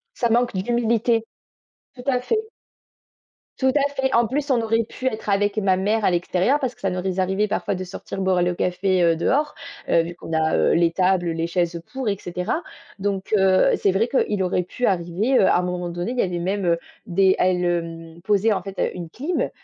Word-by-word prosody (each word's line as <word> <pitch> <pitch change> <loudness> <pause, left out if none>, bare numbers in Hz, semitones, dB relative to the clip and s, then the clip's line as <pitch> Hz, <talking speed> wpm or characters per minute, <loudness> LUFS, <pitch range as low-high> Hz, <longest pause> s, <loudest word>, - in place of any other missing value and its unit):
Ça 235 - 0
manque 240 -1 +2
d'humilité. 230 +2 +1 0.7
Tout 245 - -11
à 250 -2 +2
fait. 435 - 0 1.2
Tout 265 - +1
à 285 -1 +1
fait. 265 0 0
En 235 0 +4
plus, 280 +4 -2
on 240 - +3
aurait 225 0 +1
pu 245 +3 -9
être 220 -3 -3
avec 205 +1 +1
ma 195 -3 +2
mère 210 +3 0
à - - +3
l'extérieur 180 +10 +1
parce 255 -3 -2
que - - -25
ça 195 - 0
nous 180 0 -3
est 185 0 -2
arrivés 190 +3 +1
parfois 200 - -1
de 185 0 -4
sortir 190 +1 -7
boire 190 -2 +2
le 175 0 +1
café, 185 +1 0
heu, 165 -1 +4
dehors, 290 - 0 0.3
heu, 165 - +4
vu 170 +1 -7
qu'on 165 - -8
a, 160 0 +2
heu, - - +3
les 170 0 +3
tables, 180 -1 +1
les 165 0 -2
chaises 170 -1 -1
pour 260 -5 -2
et 200 - -1
cetera, 180 - -3 0.4
donc 195 +1 -2
heu, 190 -1 +4
c'est 195 - +2
vrai 225 +5 +1
qu'il 205 -8 +1
aurait 180 0 0
pu 245 +7 -3
arriver, 190 +7 +1
heu, 190 - +5
à - - +4
un - - +1
moment 180 -1 -3
donné, 175 +5 -3
il 255 - -5
y - - +5
avait 180 -2 -1
même, 190 +2 -1
heu, 170 -1 +3 0.3
des 190 +1 +3
elle, 180 -1 +2
hem, 165 -1 -3
posait, 210 +2 +3
en 200 - 0
fait, 195 -1 -9
heu, - - 0
une 175 -3 -7
clim 300 - -2
190 Hz, 225 wpm, -22 LUFS, 175-230 Hz, 1.2 s, heu